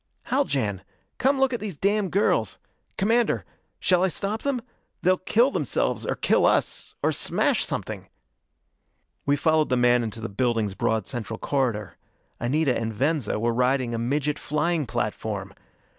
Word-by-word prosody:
"Haljan, 130 - 0 0.4
come 270 +1 +3
look 265 -1 +3
at 240 - -1
these 200 -7 -5
damn 200 +1 +1
girls! 200 +4 +1 0.4
Commander 230 +4 +2 0.3
shall 180 -1 +3
I - - +4
stop 200 +4 -2
them? 280 -3 0 0.4
They'll 185 +1 +3
kill 235 +8 +3
themselves, - - -1
or - - 0
kill - - +3
us - - 0
or - - +3
smash - - +1
something!" - - -4 1.2
We 140 - +4
followed 155 +1 +2
the 125 - +2
man 120 0 +4
into 115 0 -5
the 115 - -4
building's 110 -1 0
broad 110 +2 0
central 115 -3 -4
corridor. 120 -9 -1 0.4
Anita 135 +2 +1
and 115 0 -2
Venza 130 -1 0
were 115 +1 +1
riding 125 0 +1
a 115 - -1
midget 145 +5 0
flying 150 0 0
platform! - - -3
145 Hz, 150 wpm, -25 LUFS, 115-190 Hz, 1.2 s, I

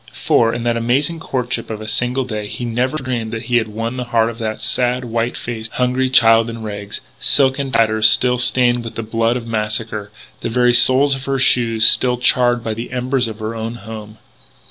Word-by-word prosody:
For, 115 -1 +2
in 120 0 -4
that 120 -1 0
amazing 140 +8 0
courtship 125 -6 -3
of 110 -1 -5
a 110 - -8
single 125 +4 -1
day, 105 -4 -5
he 120 - -6
never 125 +5 -1
dreamed 125 -5 -4
that 110 0 -5
he 120 +1 +1
had 110 -2 0
won 115 +3 -5
the 125 - -4
heart 115 -1 +1
of 115 - -13
that 110 -1 -4
sad, 125 +3 0
white 115 +1 -2
faced, 110 -2 -6
hungry 125 +1 0
child 115 -2 +4
in 115 -1 -7
rags 105 -1 -6 0.2
silken 135 0 +2
tatters 110 -2 +4
still 125 +2 +2
stained 120 -1 +2
with 115 - -8
the 115 - -4
blood 115 +2 0
of 120 - -7
massacre, 105 -1 -3 0.3
the - - -4
very 125 +1 +2
soles 135 +3 +5
of 135 0 -5
her 135 0 -1
shoes 115 -4 +3
still 125 +1 +5
charred 120 -1 +2
by 110 - -3
the 115 +3 -7
embers 125 0 -1
of 110 -2 -7
her 110 +1 -5
own 115 +1 -5
home. 110 -1 -10
115 Hz, 210 wpm, -18 LUFS, 110-125 Hz, 0.3 s, soles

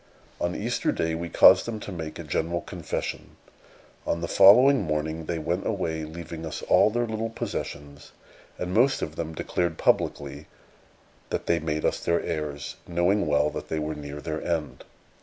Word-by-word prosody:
On 85 +1 -1
Easter - - 0
Day 80 0 -1
we 85 +1 -4
caused - - +7
them 110 -2 -4
to - - -7
make 80 -3 -6
a - - -6
general 85 +1 -1
confession. - - -5 0.7
On 85 - 0
the 85 - -3
following 125 +10 +7
morning 80 -1 -2
they 85 - -1
went 85 +4 -2
away, 80 -7 -2
leaving 80 0 -8
us 80 -2 -5
all - - +5
their 120 +2 0
little 110 0 -3
possessions; 75 -9 -6 0.5
and 90 0 -4
most 130 +6 +3
of 75 - -5
them 80 -1 -4
declared 85 0 -1
publicly - - 0 0.8
that - - -3
they 85 - +2
made 75 -1 -2
us - - +1
their 85 0 +1
heirs, 75 -3 -4
knowing 90 +2 +1
well 75 0 +2
that - - -7
they 80 - -1
were 75 0 -2
near 75 -1 -7
their 80 +1 -4
end. 80 -3 -3
80 Hz, 175 wpm, -26 LUFS, 75-90 Hz, 0.8 s, caused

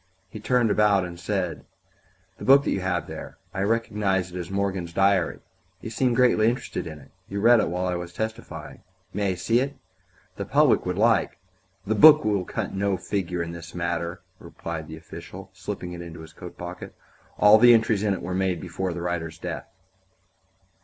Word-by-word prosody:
He 110 - -7
turned 120 0 +2
about 100 -3 +3
and 85 -1 -8
said: 90 -2 -2 0.8
"The - - -8
book 140 +1 +6
that - - -1
you - - 0
have 90 -3 -1
there - - -9 0.2
I 95 - -2
recognize 100 -4 0
it 90 - -6
as 90 - -6
Morgan's 95 -3 -2
diary. 95 -1 +2 0.4
You 115 - -7
seemed 125 0 +1
greatly 120 -3 +4
interested 120 -7 -4
in 80 -1 -7
it; 70 -2 -17 0.2
you 100 - -3
read 115 +2 +6
in - - +1
it - - -3
while 90 +1 -2
I 90 - 0
was 85 0 -5
testifying. 110 +4 -6 0.3
May 100 -1 0
I - - -6
see 115 +7 +1
it? 140 +2 -2 0.6
The - - -3
public - - +3
would 90 0 -2
like 115 +2 +2 0.2
" 95 +1 -40
"The 105 - 0
book 150 +7 +8
will 100 -4 +1
cut - - -4
no 100 0 0
figure 90 -2 -2
in 85 - -6
this 85 0 -9
matter," 85 0 -3 0.2
replied 80 -2 -7
the 80 +1 -8
official, 85 +4 -10
slipping 95 -2 -6
it 85 - -7
into 85 -1 -9
his 80 0 -12
coat 90 +2 -10
pocket; 90 +1 -8 0.4
"all 105 +1 +7
the 120 +1 +8
entries 110 -2 +2
in 105 -2 +1
it - - -8
were 90 +1 -3
made 95 -2 0
before 90 +1 -4
the 85 0 -5
writer's 85 -2 -3
death." - - -6
95 Hz, 200 wpm, -25 LUFS, 85-105 Hz, 0.8 s, book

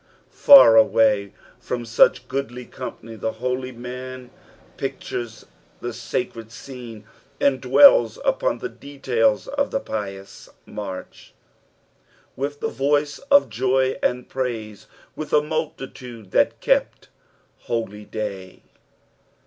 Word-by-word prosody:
Far 270 - +8
away 110 -2 +3 0.3
from 120 -1 -4
such 115 0 +3
goodly 130 -2 -4
company 115 -3 -9
(he - - -4
holy 125 +3 -3
man 125 +1 -8 0.4
pictures 115 -2 -5 0.3
the 120 0 -5
sacred 115 -1 -5
scene 120 -3 -10 0.4
and 135 -2 +2
dwells 275 - +6
upon - - +1
the 380 - -5
details 460 - -1
of 280 0 -1
the - - -1
pious 100 - -7 0.2
march. 95 -3 -8 0.5
" - - -36
With 145 +2 -4
the - - 0
voice 145 +2 0
oj" 280 0 +6
joy 130 +2 0
and 125 0 -1
praiee, 115 -6 -5 0.3
leith 155 - -7
a 150 - +5
multitude 130 - -6
that - - +2
kept - - 0 0.6
holyday." 105 -4 -5
125 Hz, 110 wpm, -22 LUFS, 110-140 Hz, 0.6 s, Far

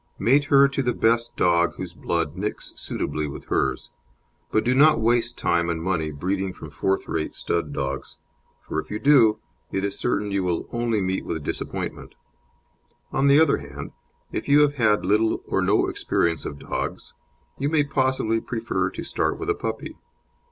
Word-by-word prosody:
Mate 135 +8 +3
her 140 -1 +6
to 140 0 -2
the 125 -2 0
best 115 +1 +1
dog 85 -1 +3
whose 90 -2 -6
blood 85 -2 -2
"nicks" 105 +3 -4
suitably 75 0 -3
with 70 - -8
hers, - - -1 0.6
but 110 - +2
do 125 - +2
not 150 +2 +6
waste 120 +1 +1
time 85 0 +1
and 85 -1 -1
money 80 -2 -1
breeding 95 +5 -2
from 80 - -10
fourth 95 +6 -1
rate 80 -1 -3
stud - - -2
dogs, 70 0 -4 0.5
for 80 - -3
if - - -7
you 105 - -3
do 115 -4 +5 0.3
it 95 +1 -1
is 100 - -2
certain 105 -4 0
you 100 -1 0
will 90 -2 -1
only 120 -3 0
meet 95 0 -1
with 80 -3 -4
disappointment. - - -5 1.0
On 135 +1 +2
the 140 +2 +7
other 160 - +4
hand, 70 0 -8 0.4
if - - -4
you 145 +1 +6
have 145 -1 +4
had 110 -8 +2
little 110 +3 +2
or - - +1
no - - +3
experience 85 -3 0
of 70 - -5
dogs, - - -5 0.5
you 140 - 0
may 155 -2 +3
possibly 130 -5 0
prefer 110 -6 -2
to - - -7
start - - -1
with - - -1
a - - +3
puppy. - - -5
105 Hz, 180 wpm, -24 LUFS, 85-125 Hz, 1.0 s, the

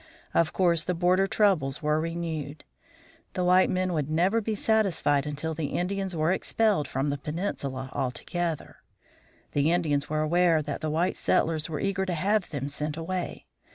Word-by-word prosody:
Of 165 -2 +3
course, 170 -3 +2
the 180 - -1
border 180 +3 +3
troubles 175 -11 +1
were 150 +1 +2
renewed. 160 -3 -4 0.7
The 180 - -1
white 180 +1 +5
men 185 0 0
would 150 -3 -1
never 185 +8 +2
be 220 0 -2
satisfied 190 -10 +2
until 150 +2 -3
the 155 -2 -2
Indians 190 +1 -2
were 155 +1 +2
expelled 200 -5 +1
from 135 +3 -1
the 140 0 -2
peninsula 140 -5 -4
altogether. 155 +5 -3 0.7
The 145 +3 +2
Indians 150 -5 +1
were 155 0 0
aware 165 0 +3
that 145 -1 -4
the 155 - -1
white 170 +4 0
settlers 160 0 +1
were 150 -3 -3
eager 195 -1 -1
to 180 - -1
have 200 +4 +1
them 140 -2 -3
sent 150 +1 -3
away. 180 +2 -4
165 Hz, 165 wpm, -27 LUFS, 150-185 Hz, 0.7 s, white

